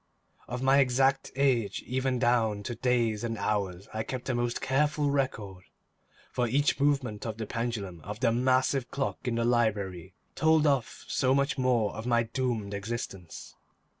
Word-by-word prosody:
Of 125 Hz, +2 st, -4 dB
my 135 Hz, +1 st, +5 dB
exact 135 Hz, +1 st, +2 dB
age, 125 Hz, -7 st, +1 dB
even 130 Hz, 0 st, 0 dB
down 115 Hz, -4 st, +1 dB
to 120 Hz, -, -4 dB
days 120 Hz, -3 st, 0 dB
and 115 Hz, -1 st, -2 dB
hours, 100 Hz, -3 st, -2 dB
I 110 Hz, -, -2 dB
kept 125 Hz, +3 st, -5 dB
a -, -, +1 dB
most 120 Hz, 0 st, -1 dB
careful 145 Hz, +2 st, +1 dB
record, 105 Hz, -10 st, -2 dB, 0.7 s
for 125 Hz, -, 0 dB
each 145 Hz, +5 st, +1 dB
movement 135 Hz, -7 st, +1 dB
of 110 Hz, -2 st, -4 dB
the 110 Hz, -, -4 dB
pendulum 105 Hz, -7 st, -4 dB
of 105 Hz, +2 st, -6 dB
the 115 Hz, -2 st, +3 dB
massive 130 Hz, +1 st, +2 dB
clock 135 Hz, -1 st, -2 dB
in 120 Hz, -, 0 dB
the 115 Hz, 0 st, 0 dB
library 100 Hz, -7 st, 0 dB, 0.2 s
tolled 160 Hz, -1 st, +3 dB
off 140 Hz, -5 st, 0 dB
so 130 Hz, 0 st, +2 dB
much 140 Hz, 0 st, 0 dB
more 120 Hz, -5 st, +2 dB
of 110 Hz, +2 st, -6 dB
my 120 Hz, -1 st, +3 dB
doomed 115 Hz, -4 st, -2 dB
existence. 100 Hz, -4 st, -6 dB
120 Hz, 165 wpm, -29 LUFS, 110-130 Hz, 0.7 s, my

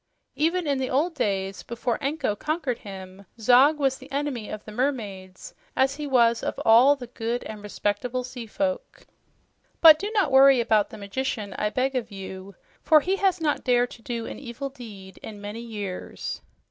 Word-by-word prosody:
Even 335 Hz, +3 st, +1 dB
in 280 Hz, -2 st, 0 dB
the 260 Hz, -, -2 dB
old 315 Hz, +7 st, +1 dB
days, 195 Hz, -8 st, -2 dB
before 235 Hz, 0 st, -3 dB
Anko 275 Hz, -6 st, -1 dB
conquered 300 Hz, -1 st, -2 dB
him, 190 Hz, -1 st, -10 dB
Zog 255 Hz, +7 st, +5 dB
was 270 Hz, -2 st, 0 dB
the 265 Hz, +2 st, -14 dB
enemy 275 Hz, -6 st, -3 dB
of 215 Hz, -, -7 dB
the 215 Hz, -, -9 dB
mermaids, 210 Hz, -7 st, -4 dB, 0.2 s
as 270 Hz, +1 st, +2 dB
he 300 Hz, -1 st, -4 dB
was 235 Hz, -3 st, +3 dB
of -, -, -3 dB
all 245 Hz, +6 st, +7 dB
the 260 Hz, -3 st, -8 dB
good 235 Hz, 0 st, -4 dB
and 215 Hz, -1 st, -8 dB
respectable 210 Hz, +4 st, -2 dB
seafolk. 255 Hz, -, -4 dB, 0.7 s
But 315 Hz, -2 st, +9 dB
do 410 Hz, -, -3 dB
not 385 Hz, -10 st, +2 dB
worry 270 Hz, 0 st, +7 dB
about 220 Hz, -3 st, +2 dB
the -, -, -10 dB
magician, 205 Hz, 0 st, -4 dB
I 210 Hz, -, -1 dB
beg 260 Hz, +4 st, -1 dB
of 235 Hz, -3 st, -2 dB
you, 195 Hz, -1 st, -9 dB, 0.3 s
for 310 Hz, -1 st, +5 dB
he 380 Hz, +6 st, 0 dB
has 380 Hz, -3 st, +1 dB
not 305 Hz, -3 st, 0 dB
dared 245 Hz, -1 st, +2 dB
to 235 Hz, -, -12 dB
do 230 Hz, 0 st, -4 dB
an -, -, -7 dB
evil 270 Hz, +1 st, -6 dB
deed 205 Hz, -8 st, -11 dB
in 210 Hz, -2 st, -9 dB
many, 205 Hz, +2 st, -7 dB
many 235 Hz, -1 st, -10 dB
years." 200 Hz, -4 st, -5 dB
245 Hz, 185 wpm, -25 LUFS, 210-280 Hz, 0.7 s, But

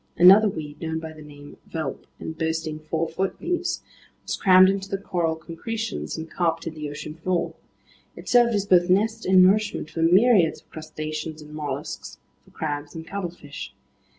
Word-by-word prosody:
Another 195 Hz, +5 st, +8 dB
weed, 150 Hz, -5 st, -7 dB
known 160 Hz, -1 st, -2 dB
by 160 Hz, 0 st, -6 dB
the 155 Hz, -, -13 dB
name 145 Hz, -1 st, -12 dB
velp 155 Hz, -5 st, -4 dB
and 160 Hz, -, -6 dB
boasting 160 Hz, -1 st, -2 dB
four 160 Hz, +1 st, -2 dB
foot 185 Hz, +4 st, -3 dB
leaves, 355 Hz, 0 st, -2 dB, 0.4 s
was -, -, -2 dB
crammed 185 Hz, -1 st, +7 dB
into 195 Hz, 0 st, -1 dB
the 195 Hz, -, -1 dB
coral 170 Hz, -4 st, -1 dB
concretions 195 Hz, +9 st, -5 dB
and 160 Hz, 0 st, -5 dB
carpeted 165 Hz, -1 st, -1 dB
the 150 Hz, -2 st, -5 dB
ocean 150 Hz, +1 st, -7 dB
floor. 170 Hz, +2 st, -1 dB, 0.6 s
It -, -, -11 dB
served 240 Hz, -2 st, +4 dB
as 200 Hz, -1 st, 0 dB
both 180 Hz, -2 st, +4 dB
nest 220 Hz, +4 st, +2 dB
and 185 Hz, 0 st, +7 dB
nourishment 200 Hz, -4 st, +2 dB
for 165 Hz, -, -3 dB
myriads 185 Hz, +1 st, +4 dB
of -, -, -37 dB
crustaceans 155 Hz, 0 st, -6 dB
and 150 Hz, 0 st, -13 dB
mollusks, 145 Hz, -2 st, -5 dB, 0.3 s
for -, -, -22 dB
crabs 145 Hz, -1 st, -4 dB
and 160 Hz, 0 st, -7 dB
cuttlefish. 175 Hz, -7 st, -7 dB
165 Hz, 170 wpm, -24 LUFS, 155-190 Hz, 0.6 s, Another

